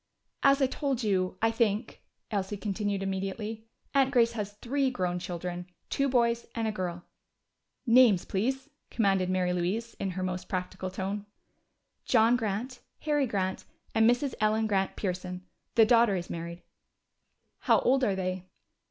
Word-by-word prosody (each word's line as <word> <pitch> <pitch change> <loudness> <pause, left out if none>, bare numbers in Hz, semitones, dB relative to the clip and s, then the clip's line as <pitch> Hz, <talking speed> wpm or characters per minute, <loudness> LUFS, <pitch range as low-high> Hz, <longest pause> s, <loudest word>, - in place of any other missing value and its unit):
"As 275 0 +5
I - - +6
told 265 -1 -2
you, 185 -3 0
I 225 - +4
think," 225 -1 0 0.3
Elsie 200 0 -2
continued 200 -1 -2
immediately, 195 +3 -4 0.3
"Aunt 270 -2 +4
Grace 235 -3 +4
has 210 -3 -4
three 265 +6 0
grown 180 -7 -1
children. 175 0 -5 0.2
Two 275 0 +1
boys 235 -2 +2
and 225 -1 -1
a - - 0
girl." 180 -4 -4 0.8
"Names, 235 -6 +6
please," 260 +7 -1 0.2
commanded 195 -5 +1
Mary 180 -1 +1
Louise 195 +7 -1
in 195 - -1
her 185 - -1
most 185 0 -4
practical 185 0 -3
tone. 195 +2 -4 0.8
"John 230 0 +4
Grant, 235 +3 -3 0.2
Harry 295 -3 +1
Grant, 190 -3 -2 0.3
and 225 +1 +5
Mrs. 250 +2 +1
Ellen 215 +1 +2
Grant 195 -3 0
Pearson. 180 -1 -4 0.3
The 225 - +7
daughter 230 -3 +5
is 175 -1 -4
married." 170 +1 -6 1.0
"How - - +4
old 265 +1 +3
are 205 -6 +2
they?" 185 -1 -3
210 Hz, 150 wpm, -29 LUFS, 185-235 Hz, 1.0 s, The